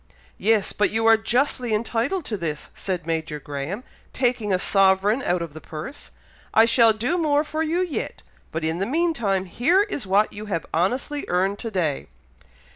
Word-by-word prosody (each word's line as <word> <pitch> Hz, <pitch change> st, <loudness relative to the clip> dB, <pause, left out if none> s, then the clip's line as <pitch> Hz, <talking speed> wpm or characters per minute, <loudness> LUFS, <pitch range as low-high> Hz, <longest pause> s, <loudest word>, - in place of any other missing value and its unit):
"Yes! 215 Hz, 0 st, +2 dB
but 205 Hz, -, +2 dB
you 225 Hz, +1 st, 0 dB
are 225 Hz, 0 st, +8 dB
justly 245 Hz, 0 st, 0 dB
entitled 235 Hz, -, -1 dB
to 220 Hz, -, -2 dB
this," 160 Hz, -6 st, -4 dB
said 180 Hz, -4 st, -4 dB
Major 160 Hz, -2 st, -2 dB
Graham, 145 Hz, -, -5 dB, 0.3 s
taking 245 Hz, -5 st, 0 dB
a 185 Hz, -, +3 dB
sovereign 195 Hz, +5 st, +3 dB
out 175 Hz, -7 st, 0 dB
of 165 Hz, -3 st, -8 dB
the 155 Hz, -, -9 dB
purse. 155 Hz, -, -8 dB, 0.5 s
"I 225 Hz, -, +7 dB
shall 230 Hz, -1 st, +5 dB
do 245 Hz, +11 st, -1 dB
more 295 Hz, -2 st, +2 dB
for 310 Hz, +1 st, -3 dB
you 325 Hz, +3 st, 0 dB
yet, 340 Hz, -, -5 dB, 0.3 s
but 160 Hz, 0 st, -3 dB
in 160 Hz, +2 st, -1 dB
the 195 Hz, -, -1 dB
meantime 240 Hz, -, 0 dB
here 330 Hz, -, +3 dB
is 290 Hz, -, -4 dB
what 200 Hz, +3 st, +3 dB
you 210 Hz, +1 st, -7 dB
have 170 Hz, -6 st, -2 dB
honestly 250 Hz, -, 0 dB
earned 190 Hz, +3 st, 0 dB
to 230 Hz, -, -4 dB
day." 170 Hz, -9 st, -1 dB
215 Hz, 180 wpm, -23 LUFS, 180-255 Hz, 0.5 s, are